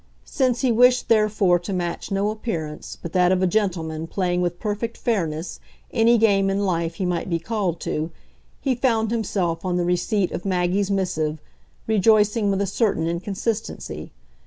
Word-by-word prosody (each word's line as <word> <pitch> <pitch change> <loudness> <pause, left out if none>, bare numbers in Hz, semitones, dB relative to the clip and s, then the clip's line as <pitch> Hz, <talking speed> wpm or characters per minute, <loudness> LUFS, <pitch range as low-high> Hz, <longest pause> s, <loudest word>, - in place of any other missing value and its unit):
Since 255 -4 0
he 255 - +2
wished 250 +2 +4
therefore 210 -5 +3
to 175 +4 -6
match 175 -2 -3
no 200 +2 +1
appearance 165 -9 -5
but 170 - -7
that 180 -1 +4
of 185 0 +2
a - - +5
gentleman 170 -5 -1
playing 180 -1 0
with 175 -1 -2
perfect 220 +2 -3
fairness 170 -8 -2 0.3
any 230 +1 +4
game 200 -3 +3
in 200 +1 0
life 170 -2 -1
he 185 - -2
might 175 0 -1
be 170 - +1
called 185 -2 -2
to, 155 +2 -2 0.5
he 270 - 0
found 230 -3 +1
himself, 190 -7 -1
on 180 -1 0
the 175 - 0
receipt 180 +2 0
of 175 - -4
Maggie's 185 +1 0
missive, 160 -6 -1 0.5
rejoicing 215 0 +3
with 195 0 +1
a - - 0
certain 195 -4 0
inconsistency. 195 +6 -3
195 Hz, 165 wpm, -23 LUFS, 175-220 Hz, 0.5 s, a